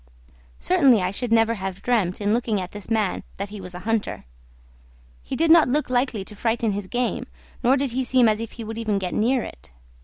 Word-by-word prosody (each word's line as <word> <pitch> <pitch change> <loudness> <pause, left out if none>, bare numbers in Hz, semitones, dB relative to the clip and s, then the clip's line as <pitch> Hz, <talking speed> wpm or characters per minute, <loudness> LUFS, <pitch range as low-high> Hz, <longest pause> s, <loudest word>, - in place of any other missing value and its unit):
Certainly 275 - +4
I 180 - 0
should 235 +4 -3
never 225 0 +4
have 195 -2 -5
dreamt 210 -8 +1
in 205 0 +1
looking 230 -3 0
at 180 -1 -5
this 205 0 -8
man 215 -5 0 0.2
that 200 +1 -4
he 205 -1 -8
was 180 -1 -8
a - - -6
hunter; 225 - -1 1.0
he - - -5
did 325 +1 +3
not 330 -5 +7
look 290 0 0
likely 245 -5 0
to 210 - -12
frighten 225 +1 0
his 200 -1 -4
game, 245 +3 -2 0.4
nor 255 +3 +4
did 275 -2 -1
he 260 +2 -1
seem 250 -1 +4
as 215 -1 +2
if 230 -1 -6
he 230 - -7
would 225 +1 -6
even 215 -3 0
get 185 -2 -3
near 240 +3 +2
it. - - -11
225 Hz, 220 wpm, -23 LUFS, 200-245 Hz, 1.0 s, not